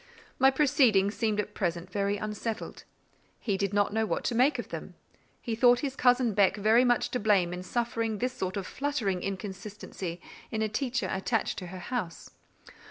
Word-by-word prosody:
My 265 +1 +7
proceedings 255 -8 +3
seemed 215 -2 0
at 210 0 -3
present 175 -2 -2
very 200 +1 0
unsettled: 215 +2 -5 0.5
he 205 -4 -1
did 195 0 -1
not 205 0 +1
know 220 0 +1
what 220 - -1
to - - -1
make 255 +6 +3
of - - -5
them: - - -7 0.4
he 230 - -4
thought 245 +2 +5
his 275 -2 -3
cousin 245 -3 +3
Beck 200 0 +3
very 220 +4 +4
much 245 -1 +2
to 250 - -1
blame 195 -5 +2
in 180 - -5
suffering 230 +1 -1
this 250 +4 -1
sort 185 -3 -3
of 195 - -3
fluttering 235 -11 -2
inconsistency 195 -2 -6 0.3
in 220 -1 -1
a - - +1
teacher 255 +3 -1
attached 215 +3 -1
to 180 - -7
her 185 +2 -8 0.2
house. 185 -9 -4
215 Hz, 180 wpm, -29 LUFS, 195-245 Hz, 0.5 s, My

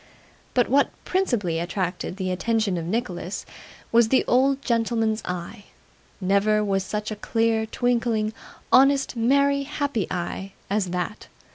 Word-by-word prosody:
But 245 -2 +3
what 280 +3 +3 0.2
principally 230 - 0
attracted 180 +1 -3
the 185 -2 -2
attention 215 +1 0
of 170 -2 -3
Nicholas 185 -3 -3 0.5
was 230 -1 +5
the 260 - +3
old 270 +2 +2
gentleman's 225 -2 +1
eye, 180 +4 -6 0.5
never 200 +2 +2
was 195 -1 0
such 210 +2 -4
a - - -2
clear, 225 +1 0
twinkling, 230 -2 0 0.4
honest, 275 0 +4
merry, 280 +4 +3
happy 285 - -2
eye, 190 +2 -4 0.2
as 205 -2 +1
that. 180 +3 -4
220 Hz, 130 wpm, -24 LUFS, 190-245 Hz, 0.5 s, was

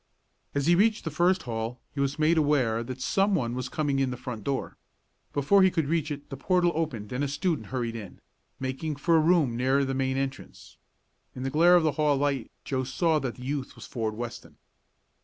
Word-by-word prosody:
As 140 -1 +1
he 170 - +5
reached 215 +5 +3
the 160 - -3
first 180 +5 +2
hall 115 0 -4
he 140 - -6
was 140 +1 0
made 155 +2 +3
aware 140 -8 +2
that 130 +2 -7
someone 185 - +1
was 125 0 -4
coming 145 -1 0
in 135 -1 +1
the 125 - -4
front 125 -4 -6
door. 135 +2 -2 0.6
Before 145 +8 +4
he 190 - +6
could 165 -4 0
reach 160 0 0
it 145 -1 -7
the - - -3
portal 180 +4 +2
opened 130 -10 -3
and 125 +3 -1
a - - +1
student 155 +3 -1
hurried 120 -3 -3
in, 105 -5 -8 0.4
making 135 +4 -3
for 165 +4 +2
a - - +6
room 155 -6 +3
near 130 +3 +2
the 135 - -2
main 130 0 0
entrance. 135 0 -6 0.6
In 130 - -5
the 135 - -2
glare 170 +4 +6
of 175 - +5
the 155 - +3
hall 145 -2 +3
light 140 -3 -1 0.2
Joe 130 -1 -1
saw 160 +4 +1
that 130 -4 -4
the 125 - -11
youth 140 0 -3
was - - -10
Ford 110 -3 -3
Weston. 115 -10 -7
140 Hz, 215 wpm, -27 LUFS, 125-160 Hz, 0.6 s, he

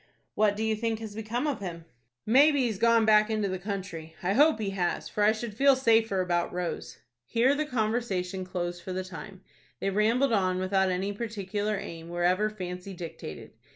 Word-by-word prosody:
"What 210 -1 +2
do 220 - -1
you 220 0 +1
think 225 0 -1
has 220 -2 -7
become 225 +5 -3
of 290 -4 -1
him?" 170 -4 -6 0.4
"Maybe 280 +5 +5
he 250 - +2
has 205 -4 -5
gone 230 0 +4
back 215 0 +5
into 215 -2 0
the 185 -1 -3
country. 180 -5 -6
I 185 +2 +1
hope 295 +3 +5
he 205 -2 -2
has, 180 -3 -1
for 210 - -3
I 210 +1 +6
should 220 0 -5
feel 275 +4 +5
safer 225 -6 +3
about 175 -1 0
Rose." 180 -1 -4 0.3
Here 245 +4 +3
the 300 +1 -1
conversation 215 -6 -1
closed 175 -1 -4
for 185 +2 -6
the 185 0 -2
time. 185 +1 -9 0.4
They 195 - -1
rambled 230 +6 +2
on 185 -3 +2
without 190 +1 +1
any 190 +2 -1
particular 210 -1 -3
aim, 165 -4 -8
wherever 180 +4 +1
fancy 185 -2 -7
dictated. 165 - -8
205 Hz, 190 wpm, -28 LUFS, 185-225 Hz, 0.4 s, I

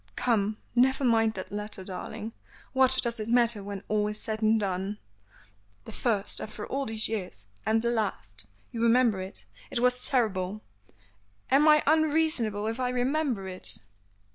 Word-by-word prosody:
"Come, 215 -3 +1 0.2
never 265 +3 +3
mind 225 -3 +3
that 185 - -6
letter, 210 -1 -4
darling; 215 +4 -6 0.4
what 260 -1 +4
does 235 -2 -1
it 215 - -4
matter 235 -3 +3
when 200 -1 -6
all 210 -1 +1
is 210 0 -4
said 220 0 -3
and 220 0 +4
done?" 195 0 -2 0.9
"The - - -8
first 210 -5 -1
after 215 0 -6
all 275 +1 -2
these 220 -1 -1
years; 185 - -4 0.2
and 225 +1 +2
the, 235 - +1
last 105 - -3 0.2
you 230 - -4
remember 230 -4 +4
it? 190 +2 -5 0.2
It 240 - -1
was 250 0 +2
terrible. 210 -5 0 0.9
Am 285 +3 +6
I 300 0 +6
unreasonable 305 -9 +2
if 225 +3 -2
I 250 -1 +1
remember 250 -4 0
it?" 185 -1 0
220 Hz, 160 wpm, -28 LUFS, 205-250 Hz, 0.9 s, Am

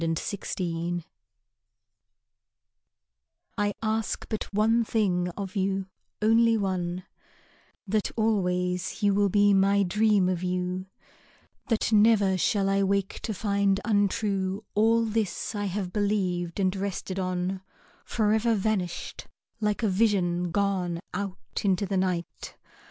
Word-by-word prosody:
To 165 - 0
a 165 - +1 0.2
Friend 175 -2 -3 2.5
I 205 0 +1
ask 220 0 -1
but 220 - -4
one 220 +3 +3
thing 185 -6 0
of 200 0 -5
you, 195 -1 -1 0.3
only 225 +1 +4
one, 185 -3 -2 0.8
That 210 +1 0
always 180 -3 0
you 200 -1 +4
will 200 0 +3
be 205 +1 +4
my 200 +1 +4
dream 205 0 +3
of 180 -2 -1
you; 180 +1 -2 0.8
That 225 -1 0
never 210 -3 +5
shall 195 +2 +1
I 195 0 +2
wake 195 0 0
to - - -4
find 200 -1 +1
untrue 200 -2 0
All 225 +2 +3
this 220 -2 -2
I 205 -1 -2
have 190 -2 -3
believed 185 -4 -1
and 190 0 +1
rested 195 -1 -3
on, 185 0 -2 0.4
Forever 220 +1 +1
vanished, 195 -4 -2 0.3
like 210 +1 -1
a - - +3
vision 185 -4 +1
gone 185 -2 0
Out 195 0 -5
into 195 0 +2
the 195 0 -1
night. 180 -3 -3
195 Hz, 125 wpm, -27 LUFS, 185-210 Hz, 2.5 s, never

